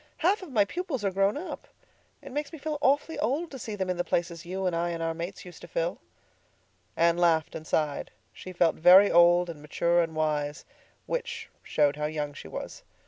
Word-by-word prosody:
Half 380 +5 +2
of 365 -6 -9
my 210 -5 +3
pupils 275 - -4
are 195 - +1
grown 195 +5 +1
up. 355 +5 -7 0.6
It - - -9
makes 295 +2 -3
me 320 - -8
feel 300 0 -4
awfully 290 +3 +1
old 290 +9 -1
to 265 - -8
see 220 -2 -5
them 190 -2 -2
in 180 -1 -1
the 175 - 0
places 170 -1 -2
you 190 +1 -3
and 180 -2 0
I 170 +1 0
and 165 -1 -3
our 165 0 -1
mates 170 +4 -6
used 180 - -12
to - - -10
fill." - - -2 1.0
Anne 170 +1 +3
laughed 165 -3 +2
and 155 - -8
sighed. 150 -2 -1 0.2
She 185 - -9
felt 175 -2 +2
very 185 +5 +7
old 175 +1 +6
and 160 -3 -8
mature 170 +3 +1
and 165 -1 -3
wise—which 155 - -4
showed 145 -1 +1
how 150 - -2
young 150 -1 -3
she 110 - -10
was. - - -7
175 Hz, 205 wpm, -28 LUFS, 165-270 Hz, 1.0 s, very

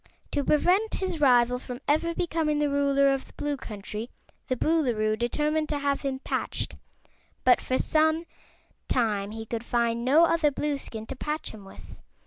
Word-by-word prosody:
To 285 - 0
prevent 365 +10 +2
his 370 -5 -3
rival 250 -2 +4
from 250 -1 -7
ever 330 +3 +1
becoming 320 -3 0
the 295 -1 +1
Ruler 280 -1 +3
of 270 - -4
the - - -19
Blue 290 0 -2
Country 215 -2 -7 0.4
the 255 - -1
Boolooroo 240 -9 +1
determined 300 +7 0
to 295 - 0
have 280 -1 0
him 275 -2 -2
patched, 265 - -3 0.7
but 255 - +5
for 255 - 0
some 315 +1 +2 0.6
time 210 -5 0
he 225 +1 -6
could 230 +1 -4
find 235 -1 0
no 295 +7 +6
other 330 -2 +3
Blueskin 275 -6 -4
to 270 - -7
patch 300 +4 -4
him 210 -3 -12
with. 195 - -13
275 Hz, 165 wpm, -27 LUFS, 235-305 Hz, 0.7 s, no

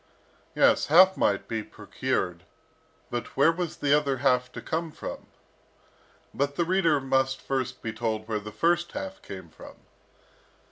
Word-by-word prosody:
Yes, - - +4
half 185 +5 +7
might 100 - +1
be 115 -1 -2
procured, 105 -4 -3 0.7
but 120 -1 -5
where 140 +4 +6
was 175 0 -4
the 145 0 +3
other 140 -3 +1
half 125 -1 +2
to - - -6
come 165 +1 -3
from? - - -8 1.1
But 140 +1 -1
the 170 - +1
reader 170 -4 +3
must 135 0 +1
first 130 -2 -3
be 115 -2 -3
told 110 -1 -3
where 110 -2 -1
the 105 0 -9
first 170 +10 +1
half 190 0 -6
came 95 -4 -9
from. 80 - -13
135 Hz, 150 wpm, -27 LUFS, 110-165 Hz, 1.1 s, half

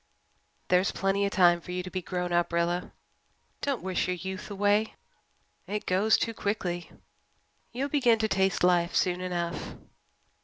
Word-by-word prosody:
"There's 180 +1 +3
plenty 195 +1 0
of - - -4
time 175 -3 +4
for 180 - -9
you 180 0 -2
to 185 - -8
be 185 - -3
grown 180 0 -3
up, 175 0 +2
Rilla. 170 +1 0 0.7
Don't 280 -4 -2
wish 185 -1 -1
your 180 - 0
youth 190 +3 -6
away. 205 +2 +1 0.7
It 210 +2 -3
goes 200 +4 +3
too 230 - -1
quickly. 185 -5 -3 0.8
You'll 260 +4 -2
begin 250 -6 +3
to 220 0 0
taste 190 -3 +1
life 175 -1 +3
soon 180 -1 +1
enough." 175 -2 -3
185 Hz, 155 wpm, -28 LUFS, 175-205 Hz, 0.8 s, time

